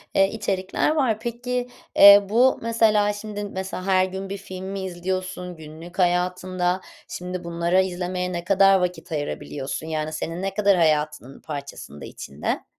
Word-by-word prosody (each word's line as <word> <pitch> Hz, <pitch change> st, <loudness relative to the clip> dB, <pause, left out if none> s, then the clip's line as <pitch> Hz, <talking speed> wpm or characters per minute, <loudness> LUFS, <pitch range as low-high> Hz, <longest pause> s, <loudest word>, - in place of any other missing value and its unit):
eee, 195 Hz, 0 st, +5 dB
içerikler 190 Hz, -1 st, -1 dB
var. 245 Hz, -8 st, +1 dB
Peki, 245 Hz, +2 st, -3 dB, 0.3 s
eee, 200 Hz, 0 st, +9 dB
bu 250 Hz, +4 st, +4 dB
mesela 220 Hz, -2 st, +3 dB
şimdi 205 Hz, 0 st, -6 dB
mesela 190 Hz, -2 st, -5 dB
her 185 Hz, -1 st, +3 dB
gün 190 Hz, +1 st, -6 dB
bir 200 Hz, -, -4 dB
film 185 Hz, -1 st, -8 dB
mi 195 Hz, 0 st, -4 dB
izliyorsun? 185 Hz, 0 st, -4 dB
Günlük 160 Hz, +4 st, -11 dB
hayatında 180 Hz, +1 st, +1 dB, 0.3 s
şimdi 180 Hz, 0 st, -6 dB
bunlara 170 Hz, +2 st, +1 dB
izlemeye 180 Hz, 0 st, -3 dB
ne 170 Hz, -1 st, -3 dB
kadar 195 Hz, 0 st, +5 dB
vakit 180 Hz, -1 st, -3 dB
ayırabiliyorsun? 145 Hz, 0 st, -4 dB
Yani 155 Hz, 0 st, -3 dB
senin 165 Hz, +3 st, -4 dB
ne 195 Hz, 0 st, -2 dB
kadar 200 Hz, -1 st, +3 dB
hayatının 150 Hz, -4 st, 0 dB
parçasında, 140 Hz, -, -8 dB
içinde? 70 Hz, +2 st, -4 dB
185 Hz, 145 wpm, -24 LUFS, 170-200 Hz, 0.3 s, eee